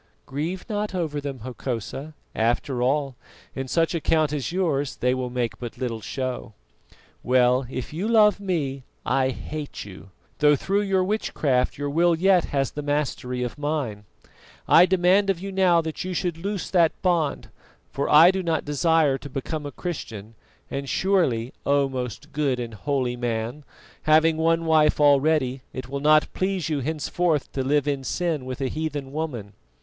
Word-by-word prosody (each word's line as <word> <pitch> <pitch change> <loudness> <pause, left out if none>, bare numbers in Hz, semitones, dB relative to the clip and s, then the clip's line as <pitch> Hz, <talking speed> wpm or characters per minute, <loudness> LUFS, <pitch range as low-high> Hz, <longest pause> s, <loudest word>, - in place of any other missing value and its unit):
"Grieve 160 +7 -4
not 210 -3 -2
over 155 -5 -2
them, 140 -4 -6
Hokosa; 130 +4 -5 0.2
after 120 +3 0
all, 135 +1 +1 0.4
in 135 0 -4
such 165 +6 +1
a 165 - -1
count 155 -1 +2
as 145 +1 -2
yours 155 -7 0
they 125 +1 +1
will 130 -1 -2
make 120 -2 -2
but 120 -2 -7
little 115 -4 -3
show. 130 -3 -4 0.7
Well, 125 0 +3
if 130 +2 -5
you 180 +7 -2
love 215 -3 +5
me, 155 -9 -2 0.2
I 130 -1 +2
hate 150 +1 -6
you, 95 -1 -12 0.3
though 150 0 +5
through 195 +8 0
your 195 -2 +1
witchcraft 155 -10 0
your 145 0 -3
will 170 +3 +3
yet 185 +1 +3
has 135 -2 -1
the 150 - -5
mastery 145 -4 -2
of 125 +4 -5
mine. 140 -9 -2 0.6
I 180 - +7
demand 190 +2 +3
of 190 -3 +1
you 195 +2 -6
now 185 -3 +4
that 160 -1 -5
you 185 0 -4
should 175 -3 -1
loose 200 +1 -4
that 170 -4 +3
bond, 170 -6 0 0.4
for 140 - -2
I 160 +4 +8
do 190 0 -2
not 165 -3 -1
desire 150 -1 +2
to 145 - -9
become 145 +3 -4
a - - -6
Christian; 115 - -6 0.4
and 140 0 -4
surely, 140 -12 +1
O 140 0 +2
most 125 -3 -5
good 140 -4 0
and 120 -2 -5
holy 130 +2 -1
man, 120 +3 -3 0.4
having 155 +1 +4
one 165 +1 +2
wife 155 -2 +4
already, 140 -2 +3
it 130 -1 -6
will 140 +1 -3
not 155 +1 +4
please 185 -3 -1
you 150 -2 0
henceforth 155 +2 -1
to 135 - -2
live 145 +2 +1
in 140 -2 -1
sin 160 -2 -2
with 130 +2 -6
a 135 - +1
heathen 145 -2 -4
woman." 130 -10 -4
145 Hz, 170 wpm, -24 LUFS, 130-165 Hz, 0.7 s, I